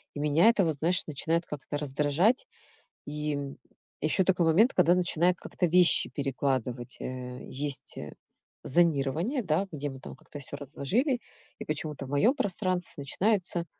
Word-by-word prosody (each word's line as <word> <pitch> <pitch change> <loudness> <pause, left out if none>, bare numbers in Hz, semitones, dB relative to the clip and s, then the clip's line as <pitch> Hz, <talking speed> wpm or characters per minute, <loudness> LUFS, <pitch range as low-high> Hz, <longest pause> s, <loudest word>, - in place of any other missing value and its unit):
И - - -4
меня 150 +6 +3
это 205 -5 +3
вот, 160 -3 -1
знаешь, 170 +4 +2
начинает 165 +3 0
как-то 145 0 -5
раздражать. 150 - +1 0.6
И, 150 0 -2
м, 140 -1 -5 0.5
еще 155 +5 +3
такой 180 -2 +2
момент, 210 +11 +4
когда 175 -1 +5
начинает 180 0 +2
как-то 180 - -4
вещи 175 +1 +4
перекладывать. 130 -3 -2
Э, 125 -1 -6
есть, 140 +1 -4
э, - - -7 0.5
зонирование, 165 - +2
да, 170 +2 +1
где 145 -1 -3
мы 135 -1 -10
там - - -9
как-то 145 - -11
всё 140 +1 -6
разложили, 210 - -1 0.4
и - - -6
почему-то 150 -2 -2
в - - -10
мое 145 - +4
пространстве 185 -7 -1
начинаются, 180 +2 0
155 Hz, 150 wpm, -29 LUFS, 140-180 Hz, 0.6 s, когда